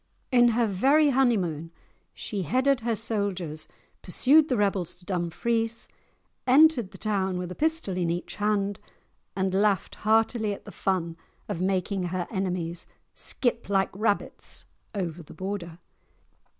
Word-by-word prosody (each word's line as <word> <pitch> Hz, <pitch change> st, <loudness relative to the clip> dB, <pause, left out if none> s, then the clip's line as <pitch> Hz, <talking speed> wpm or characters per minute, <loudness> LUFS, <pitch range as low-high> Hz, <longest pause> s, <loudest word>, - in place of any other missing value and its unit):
In 240 Hz, -1 st, +6 dB
her 240 Hz, -, +4 dB
very 270 Hz, +10 st, +4 dB
honeymoon 190 Hz, -, +1 dB, 0.5 s
she 205 Hz, -3 st, -4 dB
headed 260 Hz, -, +2 dB
her 230 Hz, 0 st, -1 dB
soldiers, 195 Hz, -8 st, -2 dB, 0.3 s
pursued 300 Hz, +4 st, +4 dB
the 250 Hz, -, +1 dB
rebels 195 Hz, -4 st, 0 dB
to 175 Hz, 0 st, -18 dB
Dumfries, 225 Hz, +6 st, -1 dB, 0.6 s
entered 265 Hz, -5 st, +5 dB
the -, -, -12 dB
town 190 Hz, -4 st, -1 dB
with 180 Hz, 0 st, -4 dB
a -, -, -3 dB
pistol 315 Hz, -, 0 dB
in 175 Hz, -2 st, 0 dB
each 175 Hz, +1 st, -3 dB
hand, 205 Hz, -1 st, 0 dB, 0.6 s
and 190 Hz, 0 st, 0 dB
laughed 200 Hz, -1 st, +2 dB
heartily 220 Hz, 0 st, +2 dB
at -, -, -10 dB
the -, -, -9 dB
fun 170 Hz, -4 st, -1 dB, 0.3 s
of 195 Hz, -5 st, -3 dB
making 190 Hz, 0 st, 0 dB
her 175 Hz, 0 st, -2 dB
enemies 180 Hz, -4 st, -2 dB, 0.3 s
"skip 235 Hz, -4 st, -1 dB
like 195 Hz, -1 st, +2 dB
rabbits" 205 Hz, +1 st, -1 dB, 0.3 s
over 175 Hz, -4 st, -3 dB
the 155 Hz, -, -13 dB
Border. 185 Hz, -4 st, -5 dB
200 Hz, 135 wpm, -27 LUFS, 180-230 Hz, 0.6 s, In